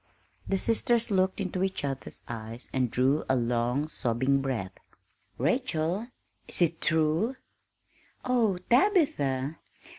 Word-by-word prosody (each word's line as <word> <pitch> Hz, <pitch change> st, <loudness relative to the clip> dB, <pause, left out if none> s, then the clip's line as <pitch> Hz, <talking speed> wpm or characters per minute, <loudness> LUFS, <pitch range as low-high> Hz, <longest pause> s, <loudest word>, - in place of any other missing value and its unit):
The 195 Hz, -, +1 dB
sisters 230 Hz, +2 st, +2 dB
looked 190 Hz, 0 st, +2 dB
into 185 Hz, -2 st, -2 dB
each 190 Hz, -5 st, -1 dB
other's 135 Hz, -1 st, -5 dB
eyes 115 Hz, +1 st, -7 dB
and 130 Hz, -2 st, +1 dB
drew 130 Hz, +6 st, +2 dB
a 130 Hz, -, +4 dB
long, 120 Hz, +4 st, 0 dB
sobbing 130 Hz, 0 st, +1 dB
breath. 120 Hz, -9 st, -2 dB, 0.7 s
"Rachel, 175 Hz, -, 0 dB, 0.4 s
is -, -, -2 dB
it 165 Hz, 0 st, 0 dB
true?" 160 Hz, +9 st, +1 dB, 0.9 s
"Oh, 235 Hz, -7 st, +2 dB
Tabitha! 165 Hz, -, +2 dB
155 Hz, 115 wpm, -28 LUFS, 130-195 Hz, 0.9 s, a